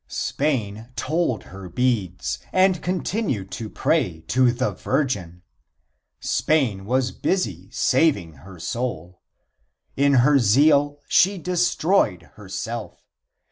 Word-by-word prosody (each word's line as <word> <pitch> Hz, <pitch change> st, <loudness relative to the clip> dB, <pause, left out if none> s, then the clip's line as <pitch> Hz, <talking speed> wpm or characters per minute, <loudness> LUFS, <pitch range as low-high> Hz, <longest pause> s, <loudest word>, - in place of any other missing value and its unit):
Spain 115 Hz, -6 st, -2 dB
told 140 Hz, -, -1 dB
her 95 Hz, -1 st, -10 dB
beads 90 Hz, -, -1 dB
and 185 Hz, -2 st, +3 dB
continued 180 Hz, -, -2 dB
to 110 Hz, -2 st, -5 dB
pray 80 Hz, -5 st, 0 dB
to 125 Hz, +6 st, +2 dB
the 130 Hz, +2 st, -1 dB
Virgin. 90 Hz, -, -2 dB, 0.8 s
Spain 125 Hz, -11 st, 0 dB
was 130 Hz, +3 st, 0 dB
busy 95 Hz, -, -2 dB
saving 125 Hz, -, +1 dB
her 95 Hz, 0 st, -12 dB
soul. 90 Hz, -4 st, -4 dB, 0.7 s
In 140 Hz, 0 st, +3 dB
her 145 Hz, -1 st, +5 dB
zeal 145 Hz, +5 st, +4 dB
she 195 Hz, +2 st, +4 dB
destroyed 175 Hz, -, +1 dB
herself. 105 Hz, +3 st, -6 dB
120 Hz, 100 wpm, -23 LUFS, 95-150 Hz, 0.8 s, her